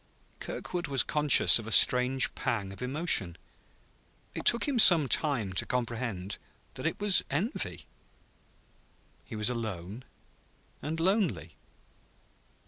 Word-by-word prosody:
Kirkwood 175 -3 -6
was 135 -3 0
conscious 150 -5 +3
of 110 - -10
a - - -7
strange 125 +3 +4
pang 100 -4 -4
of 100 - -12
emotion. 125 - 0 1.0
It - - -7
took 235 - +2
him 270 -4 -1
some 165 -9 +7
time 120 -9 0
to 90 - -1
comprehend 115 -6 -5 0.3
that - - -5
it - - -5
was 205 -2 +3
envy. 195 - -4 1.4
He 115 - -11
was 105 +3 0
alone 110 -1 -7 0.8
and 160 +2 -5
lonely. 175 - -2
125 Hz, 120 wpm, -28 LUFS, 105-160 Hz, 1.4 s, some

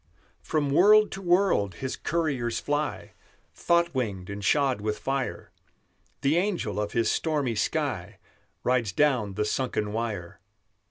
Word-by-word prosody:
From 150 -3 -1
world 210 +7 +6
to 195 - -6
world 175 - +2
His 130 +5 -4
couriers 135 -9 -1
fly, 145 +1 -3 0.4
Thought 170 0 +1
winged 100 -8 -3
and 100 0 -6
shod 135 -3 +2
with 105 0 -2
fire; 135 -1 -3 0.7
The 145 +4 +2
angel 175 - -1
of 105 - -4
His 115 -1 +2
stormy 145 -7 0
sky 110 0 -2 0.5
Rides 120 -6 +1
down 125 -9 +1
the 105 +1 0
sunken 105 -3 -1
wire. 110 -7 -4
130 Hz, 130 wpm, -27 LUFS, 105-155 Hz, 0.7 s, world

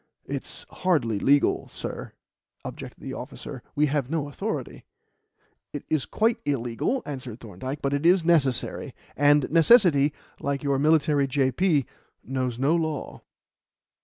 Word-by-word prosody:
"It's - - -6
hardly 130 - 0
legal, 140 +5 +3
sir," - - -7 0.5
objected - - -8
the - - -5
officer. - - -8
"We 150 - +3
have 140 -3 -1
no 155 -2 -1
authority." 145 - -4 0.9
"It - - -5
is 155 -3 0
quite 225 +1 +1
illegal," 135 - -1
answered 130 -5 -6
Thorndyke; 125 +7 -7
"but 140 0 0
it 145 +1 -1
is 175 0 +4
necessary; 140 -8 +1 0.2
and 145 0 +4
necessity 165 - +5 0.3
like 140 0 -2
your 140 -1 +1
military 150 -2 +3
J.P. 140 +3 +2 0.4
knows 130 -1 -2
no 135 +5 +2
law." 160 -4 -3
145 Hz, 130 wpm, -26 LUFS, 130-160 Hz, 0.9 s, necessity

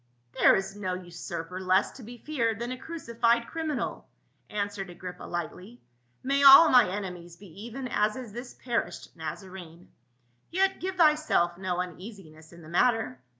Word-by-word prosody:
" 120 0 -42
There - - +7
is 195 +1 -3
no 185 -3 -3
usurper 175 0 -7
less 185 +1 +2
to 265 - -13
be 240 +2 -10
feared 235 -6 -1
than 235 +2 -4
a - - -3
cruci 315 -8 -8
fied 235 0 +4
criminal," 305 -7 -4 0.4
answered 205 -2 -3
Agrippa 180 +1 -9
lightly. 180 +7 -6 0.2
" 120 0 -42
May 275 +2 +1
all 280 +4 +10
my 250 -7 +6
enemies 180 -3 -6
be 195 +2 -12
even 255 +2 -6
as 210 -2 +1
is 245 -5 -8
this 245 +2 -8
perished 240 -2 -4
Nazarene; 170 +1 -9 0.6
yet 385 +2 +1
give 375 +1 -3
thyself 305 - +3
no 180 -1 -3
uneasiness 180 -3 -8
in 170 -1 -14
the - - -12
matter. 220 - +1
200 Hz, 165 wpm, -28 LUFS, 175-245 Hz, 0.6 s, all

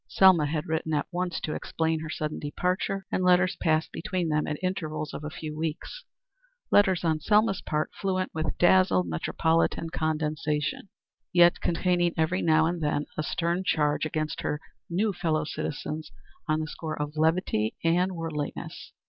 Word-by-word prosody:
Selma 185 -6 +5
had 155 +2 -2
written 160 -2 -1
at 145 - 0
once 180 -1 -2
to 155 - -3
explain 160 -1 -1
her 155 0 -6
sudden 155 0 -3
departure, 180 +5 -2
and 185 - 0
letters 180 0 +4
passed 160 -1 +1
between 180 -2 -2
them 150 0 +1
at 150 - -2
intervals 155 -5 -3
of - - -6
a 150 - -4
few 155 0 -6
weeks 160 - -4 0.7
letters 190 -4 +4
on 160 -2 +1
Selma's 210 +3 +3
part 150 0 -2
fluent 185 -2 -2
with 155 0 -2
dazzled 180 - +4
metropolitan 160 - 0
condescension, 155 +1 -1 0.4
yet 175 0 +5
containing 175 0 +1
every 160 +4 +1
now 160 -1 +4
and 170 +1 -1
then 150 -1 0
a - - -1
stern 170 +3 -1
charge 150 -4 +1
against 155 0 -2
her 150 - -2 0.3
new 200 +5 +1
fellow 160 -3 0
citizens 155 +1 -4 0.4
on 155 0 +2
the 155 - -3
score 155 0 -5
of 150 +1 -3
levity 155 - +1
and 180 +3 +2
worldliness. 160 -3 -5
160 Hz, 160 wpm, -27 LUFS, 155-180 Hz, 0.7 s, Selma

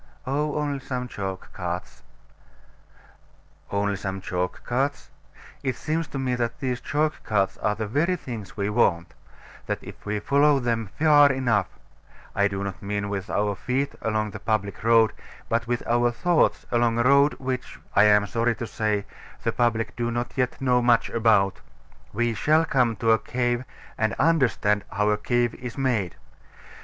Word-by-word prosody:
Oh, 145 +3 -1
only 145 -2 -1
some 125 -2 -4
chalk 95 -5 -6
carts. 90 -1 -5 1.7
Only 100 0 0
some 95 0 -4
chalk 90 -1 -3
carts? 135 +4 -1 0.5
It 130 -3 -1
seems 160 +4 -2
to - - -6
me 130 -2 -1
that 120 -1 -2
these 125 -2 -2
chalk 150 +1 -1
carts 100 -3 +1
are 105 - 0
the 110 +1 -3
very 150 - +1
things 115 - -8
we 100 -1 0
want; 100 -6 +1 0.5
that - - -1
if - - -11
we 105 0 -2
follow 140 +5 +4
them 115 -4 -1
far 145 -2 +6
enough 125 -6 +1 0.7
I 100 0 +3
do 100 -1 -4
not 100 -2 -5
mean 100 0 -2
with 100 -1 -4
our 105 0 0
feet 130 +7 -2
along 110 -1 -1
the 100 - -7
public 105 -2 -2
road, 115 -1 +5 0.4
but 115 +1 0
with 120 0 -2
our 120 +1 +3
thoughts 170 +7 +1
along 120 -1 +2
a 120 - +3
road 140 +3 +5
which, 130 -1 -5 0.2
I 100 - +7
am 105 -1 +5
sorry 115 +2 0
to 120 - -5
say, 105 -2 -1 0.4
the 115 - +1
public 115 -1 0
do 120 -1 -1
not 120 +1 -2
yet 125 -2 -1
know 125 -2 +2
much 120 -1 +3
about 110 -4 +2 0.5
we 120 +2 0
shall 155 +9 +3
come 125 -6 +2
to 115 +3 +2
a 110 - +4
cave, 120 0 -1 0.3
and 110 -2 +1
understand 125 -10 +2
how 105 -1 +1
a 105 - +1
cave 120 0 +1
is 125 0 -8
made. 120 -10 0
115 Hz, 170 wpm, -25 LUFS, 105-130 Hz, 1.7 s, I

